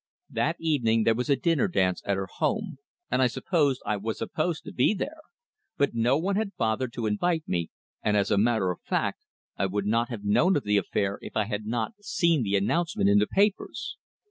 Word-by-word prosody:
That 160 +3 0
evening 120 -9 +2
there 115 - +4
was 125 +5 -3
a 140 - +5
dinner 145 +1 +1
dance 95 -2 +1
at 100 -1 +1
her 95 - -2
home, 205 - -2 0.3
and 130 - +2
I 130 - +5
supposed 140 0 0
I 105 - 0
was 110 +2 -3
supposed 160 +1 -2
to - - -9
be 130 +12 +3
there; 305 +10 -5 0.6
but 140 - +2
no 120 +4 +2
one 190 +5 0
had 200 -4 -2
bothered 115 +2 0
to 120 - -3
invite 160 +10 0
me, 85 -2 -1 0.3
and 105 0 +2
as 100 - +1
a 105 - +3
matter 110 -4 +2
of 90 - -8
fact - - -1 0.4
I 95 - +1
would 100 +1 -2
not 115 +3 +1
have 115 -5 -6
known 155 - +3
of 145 - -2
the 105 0 +2
affair 100 0 -1
if - - -6
I 110 - +3
had 105 0 -4
not 115 - -1
seen 170 -6 +2
the 100 -3 0
announcement 155 - +1
in 100 - +6
the 105 - +2
papers. 200 +1 0
120 Hz, 215 wpm, -27 LUFS, 105-160 Hz, 0.6 s, in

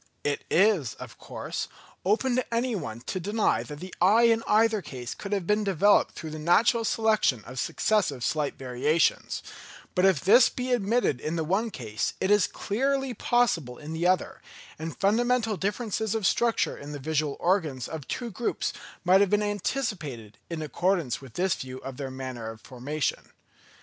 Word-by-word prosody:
It 145 -1 -1
is, 180 - +3
of - - -11
course, - - -5 0.4
open 235 +6 +2
to 255 - -2
any 235 +1 0
one 120 - -5
to 185 - -4
deny 205 +4 +1
that 150 -1 -8
the 185 0 -8
eye 210 +6 +6
in 230 -1 +4
either 220 0 +3
case 125 -6 -6
could 200 - -8
have 195 -4 0
been 210 +3 +2
developed 200 +1 +3
through 160 - -6
the 155 - -6
natural 225 +9 +3
selection 215 - +2
of 130 +1 -7
successive 175 - 0
slight 150 0 0
variations; 135 +5 0 0.5
but 180 - +1
if 190 -6 +5
this 235 +7 +6
be 250 0 -4
admitted 225 - +1
in 155 +2 -2
the 165 - 0
one 195 +8 0
case 110 - -3
it 190 - +1
is 205 -1 +5
clearly 270 +4 -1
possible 185 - +1
in 155 +1 -7
the 165 +2 +1
other; 185 0 0 0.4
and 160 +1 -5
fundamental 225 +2 +2
differences 215 +2 -2
of 220 -3 -1
structure 235 +4 +2
in 145 +1 -8
the - - -4
visual 150 0 -1
organs 160 -9 0
of 155 -5 -7
two 240 -2 -4
groups 230 +5 -2 0.3
might 185 +2 +5
have 200 - +3
been 210 +1 +2
anticipated, 185 - -3
in 165 -2 -4
accordance 170 -4 0
with 130 -4 -12
this 185 0 +2
view 130 0 -6
of 135 -1 -7
their 135 -2 -4
manner 130 -3 -6
of 110 0 -9
formation. 135 +6 -3
185 Hz, 175 wpm, -27 LUFS, 145-220 Hz, 0.5 s, eye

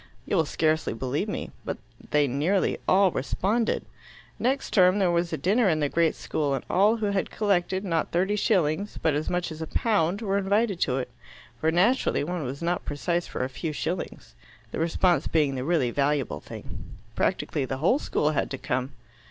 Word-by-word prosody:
You - - -1
will 165 -3 +3
scarcely 155 -3 +1
believe 130 - -2
me, - - -4
but - - -4 0.3
they 150 -1 +3
nearly 155 +10 +1
all 190 0 +5
responded. 210 - 0 0.5
Next 270 +2 0
term 185 -1 +5
there 190 -3 +3
was 170 0 0
a - - -1
dinner 200 - +3
in 155 -2 +1
the 145 -2 +1
great 165 0 +2
school, 145 -3 -1
and - - -5
all 210 +5 +4
who 220 - -2
had 195 -1 -1
collected, 190 -2 0
not 165 -4 0
thirty 190 +4 +1
shillings, 195 -3 +1
but 160 - +2
as 150 +2 -1
much 180 -1 -1
as 160 0 -7
a 160 - -3
pound, 200 -1 +1
were 200 -1 +1
invited 200 0 +1
to 130 -5 +1
it 125 -2 -4 0.5
for 160 - +2
naturally 190 - +2
one 175 +1 -3
was 135 +5 -5
not 175 +1 0
precise 170 +4 -2
for - - -3
a - - 0
few 155 +4 -4
shillings, 165 +5 -4 0.4
the - - -4
response 165 -1 +2
being 150 -4 +2
the 130 -1 -3
really 140 -6 +1
valuable 140 - 0
thing. - - -10 0.2
Practically 140 - 0
the 130 0 -3
whole 180 - +3
school 150 - 0
had 150 - -1
to 135 - -4
come." 130 +1 -2
170 Hz, 195 wpm, -26 LUFS, 145-195 Hz, 0.5 s, all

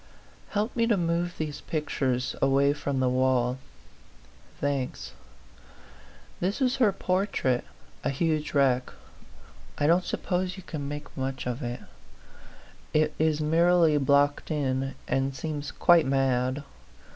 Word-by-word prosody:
Help 210 +3 -1
me 230 -1 +2
to 225 -4 +3
move 170 0 -1
these 155 -2 -4
pictures 135 -5 -1
away 140 +1 +4
from 145 -2 -2
the 130 - +2
wall. 130 0 +1 1.0
Thanks. 135 - -2 1.3
This 190 +7 -1
is 260 0 +1
her 235 -6 +4
portrait; 185 - 0 0.4
a - - +1
huge 155 +2 -1
wreck. 130 -3 +2 0.9
I 145 - +1
don't 170 +4 +4
suppose 185 +1 -2
you 190 - -9
can 145 -5 -5
make 145 +1 -7
much 130 0 -3
of 125 +2 -3
it; 120 0 -4 1.1
it 155 0 +3
is 155 -1 +2
merely 165 0 +4
blocked 140 +1 +2
in, 135 -3 -1
and 135 0 0
seems 145 -1 -4
quite 170 -5 +4
mad. 135 0 +1
145 Hz, 125 wpm, -27 LUFS, 130-170 Hz, 1.3 s, away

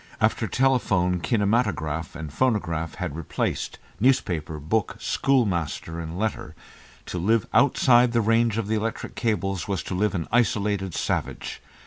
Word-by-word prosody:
After - - +1
telephone, 95 -9 +2
kinematograph 100 -5 0
and 80 -3 -7
phonograph 85 -9 0
had 90 -6 -4
replaced 80 -2 -3 0.2
newspaper, 85 - +1
book, 95 +8 -1
schoolmaster, 90 - 0
and 85 +1 -5
letter, 110 +2 -3 0.5
to 90 - -4
live 110 +5 +2
outside 125 -2 +5
the 120 - +2
range 115 0 +2
of 115 - -1
the 110 - 0
electric 115 +1 -3
cables 95 -5 -1
was 100 -3 -2
to - - -5
live 105 +3 +1
an 85 -3 -2
isolated 105 -5 +1
savage. - - -3
100 Hz, 135 wpm, -25 LUFS, 85-115 Hz, 0.5 s, outside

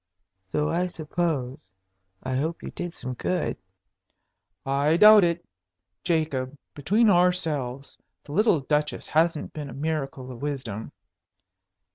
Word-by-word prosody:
"So 150 0 +1
I 180 +2 +1
suppose. 155 - -3 0.6
I 130 0 -2
hope 160 +6 -2
you - - -6
did 175 -1 -6
some 130 0 -4
good." 175 +7 -1 1.1
"I 140 +4 +2
doubt 210 +1 +9
it. 170 0 0 0.6
Jacob, 145 -5 -1 0.2
between 205 - +2
ourselves, 160 -8 +1 0.2
the - - -11
little 190 -2 +3
Duchess 150 +2 -1
hasn't 160 0 +1
been 150 -2 -6
a - - -8
miracle 140 -3 -3
of 120 - -10
wisdom." 130 -7 -4
150 Hz, 120 wpm, -26 LUFS, 135-170 Hz, 1.1 s, doubt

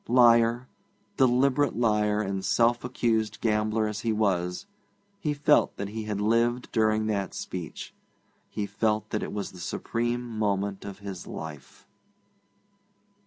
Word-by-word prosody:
Liar, 120 0 +5 0.5
deliberate 135 +2 +3
liar 105 -2 +2
and 95 -1 -3
self 120 +3 +2
accused 115 -3 0
gambler 110 0 +1
as 105 0 -4
he 115 0 -1
was, 95 - 0 0.5
he 160 -6 -1
felt 145 0 +3
that 100 0 -4
he 110 +1 -5
had 105 -2 -3
lived 115 +3 +1
during 110 -1 +2
that 100 -4 -2
speech; 90 -4 -6 0.6
he 105 - -3
felt 105 +1 -1
that 105 - -1
it - - -4
was 105 -1 -4
the 90 - -12
supreme 120 +7 -2
moment 100 -2 -1
of 100 -1 -7
his 95 -3 -6
life. 75 -3 -9
110 Hz, 135 wpm, -27 LUFS, 100-120 Hz, 0.6 s, Liar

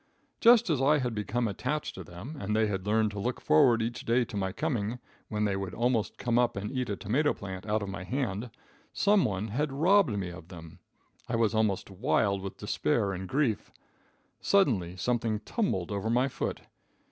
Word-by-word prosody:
Just 230 -6 +6
as 140 -4 +1
I 150 +3 +4
had 125 -4 -1
become 115 +3 -1
attached 150 +9 -3
to 95 - -8
them, 90 - -9
and 105 +2 -2
they 110 0 +3
had 100 -2 -3
learned 110 0 +2
to 105 - -6
look 120 +4 -2
forward 115 +9 +4
each 120 +1 -4
day 120 +1 +2
to - - -9
my 95 -2 -1
coming, 120 -3 -2 0.3
when 105 0 -1
they 100 -2 0
would 95 -2 -4
almost 120 -2 0
come 120 -1 +1
up 120 -1 +2
and 105 +1 -3
eat 130 -3 -2
a 100 - -1
tomato 135 +11 +1
plant 95 0 -7
out 105 0 0
of 100 - -5
my 95 -1 -5
hand, 120 -1 -2 0.4
some 205 -2 +3
one 100 +1 -2
had 140 +7 -1
robbed 160 - +3
me 90 -3 -3
of 85 -1 -11
them. 85 -3 -11 0.5
I 120 - 0
was 115 -1 +2
almost 110 -3 0
wild 100 -2 +1
with 95 0 -6
despair 100 +6 0
and 95 0 -6
grief. 130 -7 0 0.7
Suddenly 110 - +2
something 115 +1 0
tumbled 105 - -1
over 100 +2 -2
my 125 +3 +3
foot. 135 - -4
110 Hz, 195 wpm, -29 LUFS, 100-125 Hz, 0.7 s, Just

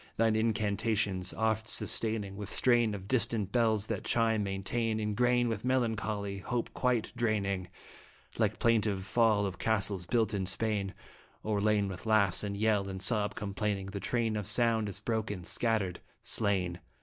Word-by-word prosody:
Thine 115 -1 +3
incantations 105 -3 0
oft 110 0 0
sustaining 110 -4 0
With 105 0 -6
strain 120 -3 +3
of 95 -1 -8
distant 115 -4 0
bells 110 -4 +2
that - - -3
chimes 115 -2 +2
maintain 110 +3 -1
Ingrain 120 +3 +2
with 110 -3 -3
melancholy, 110 -5 -1
hope 120 +3 -3
quite 125 -4 0
draining, 100 -5 -1 0.7
Like - - +1
plaintive 105 -5 +1
fall 110 -3 +3
of 95 -2 -5
castles 100 -5 0
built 110 0 +1
in 95 -2 -1
Spain. 100 -1 -1 0.5
O'erlain 105 -1 +1
with 95 +2 -7
laugh 100 -5 +3
and 100 -1 -3
yell 105 -2 +1
and 95 0 -5
sob 105 +1 +1
complaining, 100 -1 -3
The 100 - -4
train 115 +2 -1
of 105 -2 -3
sound 115 -3 +3
is 100 - -5
broken, 110 -5 -3
scattered, 100 -3 -1 0.2
slain. 95 -5 0
105 Hz, 150 wpm, -31 LUFS, 100-115 Hz, 0.7 s, Thine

